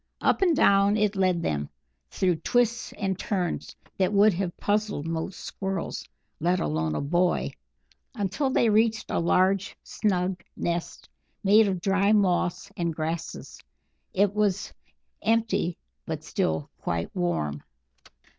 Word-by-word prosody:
Up - - +2
and 355 -4 +4
down 200 -3 +4
it 210 -1 +1
led 185 -3 +1
them, 75 - -1 0.4
through 180 -3 +1
twists 235 +7 +1
and 195 -2 -2
turns 180 -5 -2 0.2
that 190 0 +2
would 205 +1 +5
have 175 0 -3
puzzled 205 -7 0
most 165 +3 -3
Squirrels, 195 -1 -4 0.3
let 175 +3 +2
alone 80 +1 -1
a - - -1
boy, 175 +5 +1 0.6
until 225 +6 -1
they 240 - +3
reached 220 +1 +2
a - - +1
large 185 +3 +2
snug 185 -3 -1
nest 170 0 -3 0.4
made 210 +2 +6
of 185 -3 -2
dry 195 +2 +3
moss 185 -1 +1
and 170 -2 -2
grasses. 160 +1 -4 0.5
It 200 +1 +2
was 205 -2 0 0.5
empty, 220 -6 +1 0.3
but - - -4
still 80 -2 -1
quite 85 0 -3
warm. 75 - -1
190 Hz, 130 wpm, -26 LUFS, 170-205 Hz, 0.6 s, made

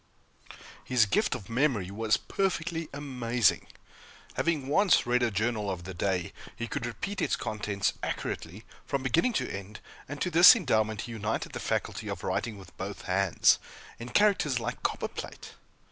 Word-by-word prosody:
His 125 -3 +3
gift 150 - +1
of 110 -6 -8
memory 115 -6 0
was 110 +1 +1
perfectly 165 -4 -2
amazing. 125 - 0 0.7
Having 155 -6 0
once 190 +7 +4
read 125 +1 +2
a 120 - +3
journal 110 0 -1
of 90 -2 -4
the 95 +2 -7
day, 90 0 -1 0.2
he 120 - -4
could 115 - -3
repeat 195 - -4
its - - +1
contents 105 -2 -2
accurately, 95 +7 -4 0.2
from 140 -2 -1
beginning 165 - +2
to - - 0
end; 100 +2 -8 0.3
and 145 +1 -6
to 180 - -1
this 175 +8 +10
endowment 110 - 0
he 120 - -7
united 110 0 -3
the - - -5
faculty - - -2
of - - -5
writing 115 -3 -2
with 95 - -14
both 100 +1 -6
hands, 95 -1 +3 0.4
in 120 +1 -7
characters 170 - +3
like 120 +2 -4
copperplate. - - -4
115 Hz, 160 wpm, -29 LUFS, 105-145 Hz, 0.7 s, this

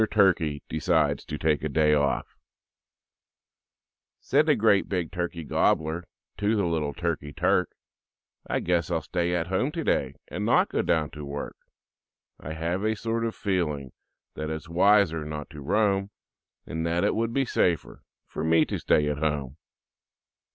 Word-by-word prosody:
TURKEY 85 -8 +2
DECIDES 80 -3 +1
TO 75 - -5
TAKE 75 -1 +1
A - - -1
DAY 75 +1 +3
OFF 70 -2 +1 1.9
Said 150 +3 +2
the 150 - +5
great 105 -4 +3
big 90 -4 -2
Turkey 85 -2 -3
Gobbler 80 +3 +1 0.3
To 105 +2 +1
the 100 -3 +1
little 80 -4 -1
Turkey 80 -4 -2
Turk, - - +1 0.8
"I - - 0
guess 85 -2 0
I'll 80 -3 -1
stay 90 +1 -1
at 85 -1 0
home 95 - 0
today 70 - 0
And - - -4
not - - +3
go - - 0
down 80 -3 0
to 75 - -8
work; 70 0 -5 0.8
"I 80 - -6
have 85 +5 -2
a 110 0 +1
sort 115 +1 -2
of 115 -1 -2
feeling 75 - -1 0.4
That 75 0 -4
it's 80 +2 -5
wiser 90 -2 +3
not 75 +1 -6
to 75 -2 -9
roam 100 +4 +1 0.6
And 80 +2 -4
that 85 +1 +1
it - - +2
would 115 +1 -1
be 135 +2 +1
safer 85 -7 0 0.2
For - - -5
me 80 0 +4
to - - -3
stay 75 -1 +2
at 75 -1 -1
home." 75 -4 -1
85 Hz, 160 wpm, -26 LUFS, 75-95 Hz, 1.9 s, the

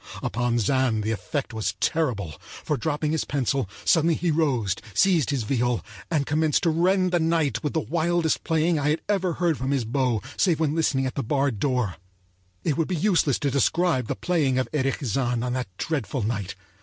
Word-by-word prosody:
Upon 120 0 0
Zann 120 -1 +1
the 110 - -1
effect 125 +4 -3
was 110 -1 -2
terrible, 120 - 0
for, 150 - -4
dropping 150 +3 -1
his 160 - 0
pencil, 135 -5 -1 0.2
suddenly 165 0 +4
he 175 0 0
rose, 130 - +1 0.2
seized 175 -8 +3
his 140 -5 0
viol, 120 0 0 0.2
and 150 -4 +1
commenced 155 0 +1
to 170 - +3
rend 185 +3 +2
the 175 - +2
night 160 -3 +1
with 150 - -1
the 160 - +1
wildest 170 +1 0
playing 160 0 +1
I 145 +1 +1
had 155 - 0
ever 190 -4 +1
heard 170 -3 0
from 130 +1 -2
his 135 -4 0
bow 120 -3 0
save 175 -5 +2
when 155 -2 +1
listening 150 -5 +1
at 130 - -2
the - - -2
barred 135 -3 0
door.It 95 - -4
would 165 - +1
be 185 - -1
useless 165 - +2
to 140 - -1
describe 140 -1 +1
the - - -2
playing 150 -8 +1
of 130 - 0
Erich 135 -1 0
Zann 120 0 0
on 125 - -2
that 125 -1 -2
dreadful 135 - -2
night. 100 -4 -3
140 Hz, 195 wpm, -25 LUFS, 120-160 Hz, 0.2 s, suddenly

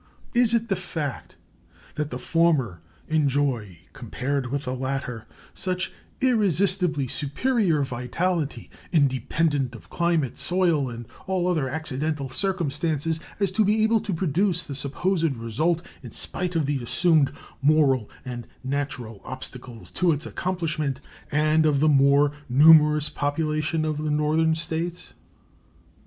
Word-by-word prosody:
Is 240 -1 +4
it 230 0 0
the 195 - +1
fact 160 -7 -5 0.6
that 150 -1 -3
the 125 - -4
former 140 - +1 0.3
enjoy, 135 - 0
compared 130 +3 -3
with 140 +3 -3
the 125 - -2
latter, 130 -3 -4 0.3
such 185 0 -2 0.3
irresistibly 190 - +2
superior 165 - 0
vitality, 140 +6 -2 0.2
independent 140 -2 +1
of 115 - -14
climate, 170 -7 0
soil, 170 -7 +2
and 120 0 -7 0.2
all 185 -2 0
other 155 -7 0
accidental 150 -1 -2
circumstances, 160 -2 -1 0.2
as 200 -2 +1
to 215 +3 +2
be 215 +2 +2
able 220 +1 +3
to - - -4
produce 180 +2 0
the 145 - -7
supposed 160 +3 -1
result 150 +10 -1 0.2
in 125 - -9
spite 180 +8 -3
of 160 -3 +2
the 140 -2 -1
assumed 155 +3 +3 0.3
moral 135 -6 +3 0.2
and 120 -2 -6 0.2
natural 130 -6 -4
obstacles 125 -2 -7
to 175 -2 +2
its 145 - -3
accomplishment 160 -7 -2 0.3
and 155 +1 +3
of 150 -3 +3
the 155 - +3
more 140 0 +5 0.2
numerous 150 +2 +6
population 155 +2 -1
of 155 -1 -2
the 155 0 -2
Northern 155 +2 +2
States? 165 +2 -4
150 Hz, 130 wpm, -25 LUFS, 135-170 Hz, 0.6 s, numerous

